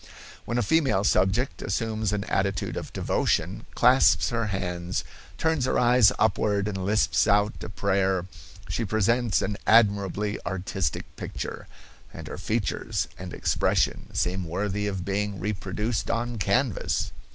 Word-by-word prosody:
"When 120 - -2
a 120 - +2
female 135 -6 +2
subject 105 +6 +1
assumes 110 +1 -1
an 105 -1 -1
attitude 100 0 -1
of - - -5
devotion, - - -1
clasps 125 +2 +5
her 115 -2 -1
hands, 90 -2 -3 0.3
turns 160 -5 +1
her 130 - +1
eyes 120 -3 +5
upward 105 -2 +1
and 95 -3 -3
lisps 105 +3 +2
out 105 +1 +2
a 85 - -6
prayer, 95 -2 0 0.4
she 95 +6 -2
presents 110 +2 +1
an 105 - -2
admirably 105 -2 +3
artistic 95 0 -3
picture, - - -6 0.4
and - - -9
her - - -7
features - - -2
and 90 -1 -7
expression - - 0
seem 90 +1 0
worthy 100 +4 -2
of 95 -3 -3
being 100 0 -2
reproduced 105 +3 -2
on 115 0 -2
canvas." 105 +4 0
105 Hz, 135 wpm, -26 LUFS, 95-115 Hz, 0.4 s, clasps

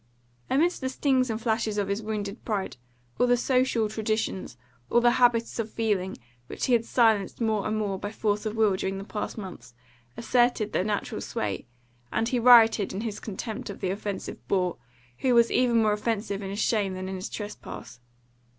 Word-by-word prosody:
Amidst 335 +7 +2
the 260 - -1
stings 260 -1 +1
and 220 -1 -2
flashes 220 -2 0
of 200 -1 0
his 200 +2 -1
wounded 210 -1 -4
pride, 200 - -3 0.4
all 245 - +4
the 245 0 +4
social 250 -3 +2
traditions, 215 - -2 0.3
all 240 - +4
the 240 0 +5
habits 235 -1 +3
of 225 -1 -2
feeling, 205 -5 -1 0.3
which - - -3
he 255 - +2
had 230 -1 +3
silenced 220 -6 +2
more 220 -3 0
and 215 0 -1
more 200 -3 -2
by 205 - -4
force 210 0 -1
of 215 - -4
will 215 -3 +3
during 190 +1 -2
the 195 - -5
past 210 +2 -5
months, 130 - -9 0.4
asserted 240 -3 +2
their - - +2
natural 205 - -2
sway, 100 +1 -3 0.4
and 225 +1 0
he 250 - +1
rioted 225 -4 +6
in 195 - -3
his 220 -3 -4
contempt 215 +1 -5
of 200 - -7
the 185 -2 -1
offensive 200 0 -5
boor, 180 -3 +1 0.4
who 255 -2 +2
was 235 0 +5
even 235 -3 +3
more 210 -1 +3
offensive 210 -2 -2
in 195 - -5
his 200 - -5
shame 205 -4 +1
than 185 0 -5
in 190 - -4
his 185 0 -5
trespass. 120 - -8
215 Hz, 190 wpm, -27 LUFS, 195-230 Hz, 0.4 s, rioted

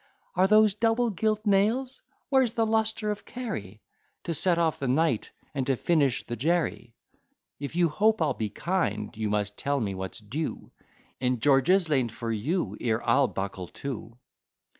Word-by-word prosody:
Are 185 +1 +3
those 215 0 +5
double 225 +2 +1
gilt 215 +2 -1
nails? 220 +6 +1 0.3
Where's 260 -4 +3
the 230 -2 +1
lustre 220 -1 0
of 210 - -5
Kerry, 110 - -6 0.4
To 170 - -2
set 170 +3 +3
off 160 -2 +1
the 135 - -2
Knight, 130 -3 +1 0.2
and 135 -2 -2
to 135 - +2
finish 140 -3 +1
the 120 - -4
Jerry? 150 -4 -1 0.6
If 145 +3 -5
you 175 -1 +4
hope 215 +7 +2
I'll - - +1
be 110 -2 -3
kind, 165 - -2
you 110 -1 -2
must 105 0 -1
tell 140 0 0
me 100 -5 -2
what's 95 -1 -5
due 120 +9 -5 0.5
In 125 -1 0
George's 145 - +4
lane 135 -6 +1
for 115 +1 -5
you, 115 - -1
ere 115 -1 -1
I'll 140 -1 +4
buckle 95 -3 -5 0.2
to. 115 -3 -5
150 Hz, 165 wpm, -27 LUFS, -, 0.6 s, those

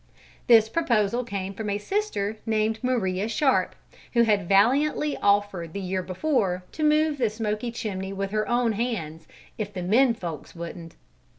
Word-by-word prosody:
This 225 -2 +7
proposal 235 -4 +1
came 195 -4 -4
from 210 +1 -4
a 200 - 0
sister 220 - -2
named 220 0 +1
Maria 205 -6 0
Sharp, 270 +3 +1 0.4
who 235 -1 +5
had 205 -5 +1
valiantly 275 +9 +3
offered 200 -5 +1
the 200 - -4
year 185 0 -2
before 185 - -1
to 310 - -4
move 305 -1 +3
the 235 -3 +2
smoky 215 +1 -3
chimney 195 -4 -4
with 195 0 -3
her 215 0 -1
own 240 -1 +2
hands, 200 -9 -3 0.3
if 210 -1 -3
the 185 -3 -5
"men 230 +6 +4
folks" 165 -7 -7
wouldn't. 170 0 -8
215 Hz, 160 wpm, -25 LUFS, 190-240 Hz, 0.4 s, This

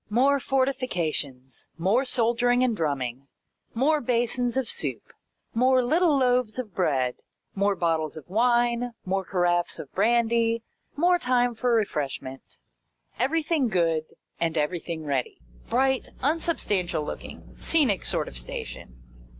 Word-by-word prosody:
More 270 +6 +3
fortifications, 170 - -1
more 200 +10 +2
soldiering 245 0 +3
and 245 -3 +1
drumming, 140 - -2 0.5
more 295 +5 +2
basins 245 +1 0
of 265 -3 0
soup, - - -2 0.4
more 255 +2 +4
little 315 +3 +3
loaves 250 -3 +2
of 230 -7 -5
bread, 135 -9 0 0.4
more 200 0 +1
bottles 160 -3 -1
of 155 - -10
wine, 240 +3 +1
more 195 +1 0
caraffes 175 -1 0
of 140 - -8
brandy, 230 +2 +2 0.3
more 350 +4 +3
time 245 -3 +2
for 245 +2 0
refreshment. 140 -10 -3 0.6
Everything 310 0 +1
good, 165 -6 +1 0.3
and 165 -1 0
everything 160 +1 -2
ready. 135 -4 -2 0.3
Bright, 265 +1 +1
unsubstantial 210 - 0
looking, - - -8
scenic 275 - +1
sort - - 0
of - - -9
station. - - -8
230 Hz, 120 wpm, -26 LUFS, 165-255 Hz, 0.6 s, more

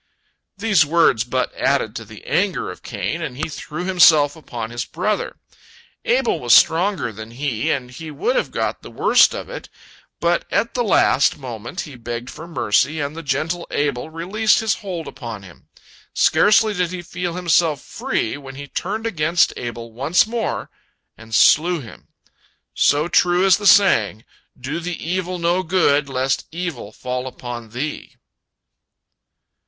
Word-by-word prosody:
These 200 -6 +3
words 150 -7 +3
but 125 +1 -2
added - - 0
to - - -6
the - - -13
anger - - 0
of - - -12
Cain, 165 - -4
and 135 -6 -5
he 155 - -2
threw 155 +2 -6
himself 160 -6 +5
upon 120 -7 -7
his 120 +2 -3
brother. 205 +5 -2 0.7
Abel - - +1
was - - +5
stronger 180 - +3
than 110 +1 -9
he, 120 -2 -2
and 125 -3 -2
he 155 +5 -8
would 460 - -1
have - - 0
got - - -2
the - - -11
worst - - +4
of - - -6
it, - - -8 0.5
but 170 0 +1
at 230 - 0
the 245 - 0
last 145 - +3
moment 120 - -6
he 145 -4 -9
begged 120 +1 -6
for 165 - -10
mercy, 155 0 +1
and 145 +1 -3
the 165 - -6
gentle 160 +4 -2
Abel 145 -1 -1
released 190 +7 +1
his 220 -2 +1
hold 180 -6 -6
upon 115 -6 -8
him. 90 -5 -16 0.5
Scarcely 215 +1 +4
did 180 -3 0
he 180 0 -6
feel 175 0 -4
himself 170 -4 +2
free, 115 - -3
when 135 -2 -10
he 145 +1 -7
turned 210 +10 -4
against 170 -5 +2
Abel 115 -1 -6
once 140 +9 +2
more, 225 0 -3 0.4
and 110 0 -7
slew 170 +8 +5
him. 115 -6 -12 0.7
So 150 +3 +2
true 175 +1 +3
is 190 -1 +5
the 205 -1 -1
saying, 110 - +4 0.3
"Do 140 +6 -4
the 175 0 -4
evil 185 +1 -2
no 175 +2 +1
good, 155 -5 +2
lest 130 0 -1
evil 165 - -5
fall 125 +3 -4
upon 120 -3 -7
thee." 135 +7 -5
155 Hz, 160 wpm, -20 LUFS, 125-180 Hz, 0.7 s, himself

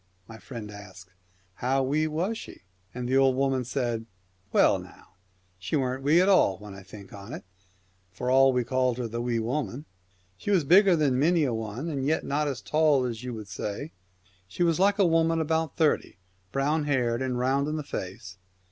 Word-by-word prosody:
My 110 0 -11
friend 115 -5 -8
asked, 95 -3 -12 0.3
' 95 0 -38
How 135 +1 +2
wee^was 155 +8 0
she? 220 - -10
' 95 0 -40
And 125 0 -4
the 130 +2 +2
old 135 -1 +4
woman 135 -1 +1
said, 120 -2 -2 0.2
' 95 +1 -40
Well - - +4
now, - - -14 0.5
she 95 +1 -3
wasn't 130 -2 -1
wee 155 +4 +5
at 185 - +4
all 180 - +4
when 105 -1 -10
I 100 - -10
think 95 0 -13
of 100 +3 -10
it, - - -7 0.7
for 125 +7 -3
all 135 +1 +6
we 125 -1 +1
called 130 0 0
her 125 -2 -3
the 115 +1 -4
Wee 120 -1 -1
Woman. 125 +3 -3 0.5
She - - -6
was 190 -6 +3
bigger 185 +5 +6
than 140 -5 +1
many 165 +3 +3
a 130 -4 0
one, 110 +6 -4
and 140 -5 -3
yet 155 +4 +1
not 145 +1 0 0.2
tall 150 -4 +3
as 115 -1 -4
you 125 -2 -5
would 110 -2 -8
say. 105 - -5 0.6
She 95 - -2
was 170 -1 +2
like 200 +2 +3
a 200 - +4
woman 165 -1 +2
about 160 -1 -1
thirty, 155 - +1 0.3
brown 145 +3 0
haired 125 -4 0
and 130 -1 -1
round 135 +3 +1
in 155 - -2
the 155 - -3
face. 95 -5 -7
130 Hz, 200 wpm, -27 LUFS, 110-155 Hz, 0.7 s, all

